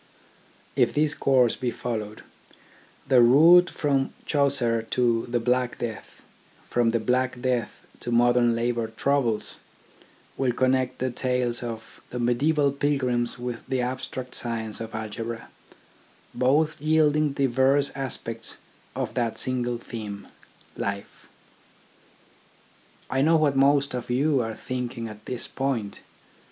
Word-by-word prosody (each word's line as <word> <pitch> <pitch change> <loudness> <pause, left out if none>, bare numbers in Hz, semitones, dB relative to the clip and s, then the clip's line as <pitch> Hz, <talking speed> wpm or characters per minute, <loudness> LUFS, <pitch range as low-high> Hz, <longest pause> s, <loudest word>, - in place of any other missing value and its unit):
If - - +2
this 150 0 +2
course 130 -5 +3
be 125 - -2
followed, 110 -3 -5 0.8
the 130 -2 +6
route 165 +9 +7
from 140 -2 0
Chaucer 135 -6 +3
to 120 -2 +1
the 120 0 0
Black 125 +1 0
Death, 115 -4 -7 0.4
from 120 -1 +2
the 115 0 +1
Black 125 +2 0
Death 125 -3 -2
to 120 - -5
modern 120 0 +4
Labour 115 -1 -1
troubles, 115 -1 -1 0.8
will 130 -2 +1
connect 130 0 +1
the 130 0 -2
tales 125 -1 -1
of 115 -2 -7
the 125 - -6
mediaeval 140 +5 +2
pilgrims 130 -4 0
with 120 -1 -4
the 130 -1 0
abstract 125 0 -4
science 115 -2 -3
of 115 -1 -6
algebra, 115 +1 -5 0.8
both 145 +5 +1
yielding 155 -1 +2
diverse 135 +1 +2
aspects 115 -4 -5 0.4
of - - -3
that 120 -3 -1
single 125 -2 -1
theme, 105 -4 -7 0.5
Life. 100 0 -5 1.8
I 135 - 0
know 160 +4 +4
what 150 -3 +2
most 140 +1 +3
of 125 -1 -5
you 135 +2 +2
are 110 -1 -4
thinking 120 -1 -4
at 105 -1 -12
this 125 -2 -4
point. 130 -7 -3
125 Hz, 125 wpm, -25 LUFS, 115-135 Hz, 1.8 s, route